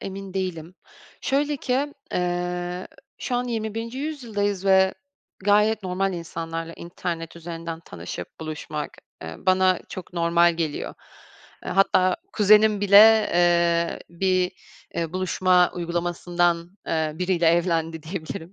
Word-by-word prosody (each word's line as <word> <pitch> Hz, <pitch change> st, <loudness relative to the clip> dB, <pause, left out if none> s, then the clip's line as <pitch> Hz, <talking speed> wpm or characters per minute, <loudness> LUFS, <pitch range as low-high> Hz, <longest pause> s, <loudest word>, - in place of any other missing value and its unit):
emin 195 Hz, 0 st, -7 dB
değilim. 180 Hz, -3 st, -4 dB, 0.5 s
Şöyle 290 Hz, +1 st, 0 dB
ki, 275 Hz, +3 st, -1 dB, 0.2 s
eee, 180 Hz, 0 st, -2 dB, 0.3 s
şu 250 Hz, -, -3 dB
an 245 Hz, -, -1 dB
21'nci 225 Hz, +1 st, -4 dB
yüzyıldayız 220 Hz, -10 st, -2 dB
ve 190 Hz, 0 st, +5 dB, 0.5 s
gayet 210 Hz, +1 st, +3 dB
normal, 190 Hz, +1 st, -1 dB
insanlarla 165 Hz, -1 st, -5 dB
internet 170 Hz, -1 st, -5 dB
üzerinden 165 Hz, -1 st, -6 dB
tanışıp 90 Hz, -, -8 dB
buluşmak, 155 Hz, -1 st, -5 dB, 0.3 s
eee, 80 Hz, 0 st, -7 dB
bana 185 Hz, -1 st, +3 dB
çok 185 Hz, -1 st, -8 dB
normal 170 Hz, 0 st, +3 dB
geliyor. 160 Hz, -3 st, -3 dB, 0.7 s
Eee, -, -, -5 dB
hatta 185 Hz, -1 st, +3 dB, 0.2 s
kuzenim 210 Hz, 0 st, +5 dB
bile, 210 Hz, +2 st, +7 dB
eee, 170 Hz, -1 st, +3 dB
bir, 185 Hz, +1 st, +1 dB, 0.4 s
eee, 165 Hz, -1 st, -2 dB
buluşma 185 Hz, -1 st, +3 dB
uygulamasından, 175 Hz, 0 st, -1 dB, 0.2 s
eee, 160 Hz, -1 st, 0 dB
biriyle 180 Hz, 0 st, 0 dB
evlendi 165 Hz, -1 st, +1 dB
diyebilirim. 165 Hz, +1 st, -6 dB
180 Hz, 115 wpm, -24 LUFS, 170-195 Hz, 0.7 s, bile